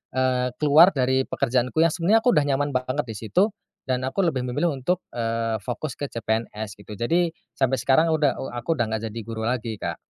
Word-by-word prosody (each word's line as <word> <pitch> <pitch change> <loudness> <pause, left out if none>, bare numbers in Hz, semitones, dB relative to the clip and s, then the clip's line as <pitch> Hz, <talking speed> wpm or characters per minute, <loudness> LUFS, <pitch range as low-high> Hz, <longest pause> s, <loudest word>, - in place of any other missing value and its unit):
eee, 130 -1 +1
keluar 155 +4 +7
dari 130 0 +2
pekerjaanku 125 +3 0
yang 165 - +3
sebenarnya 190 +6 +3
aku 245 - +6
udah 150 - +4
nyaman 145 +1 0
banget 130 +3 -1
di 110 - -6
situ, 185 - +3 0.4
dan 130 -1 0
aku 135 +9 -3
lebih 130 -6 -1
memilih 145 +5 0
untuk, 150 +7 -1 0.2
eee, 115 -1 -1
fokus 125 +4 -4
ke 145 - -3
CPNS 110 -2 -3
gitu. 100 - -13
Jadi, 170 +8 +1 0.3
sampe 135 -1 +1
sekarang 135 +7 +3
udah 150 -3 +2
eee, 135 - -5
aku 120 +7 -1
udah 120 - +2
nggak 110 0 -2
jadi 115 +2 -7
guru 115 -1 -5
lagi 115 -3 -2
Kak. - - -3
130 Hz, 200 wpm, -24 LUFS, 115-150 Hz, 0.4 s, keluar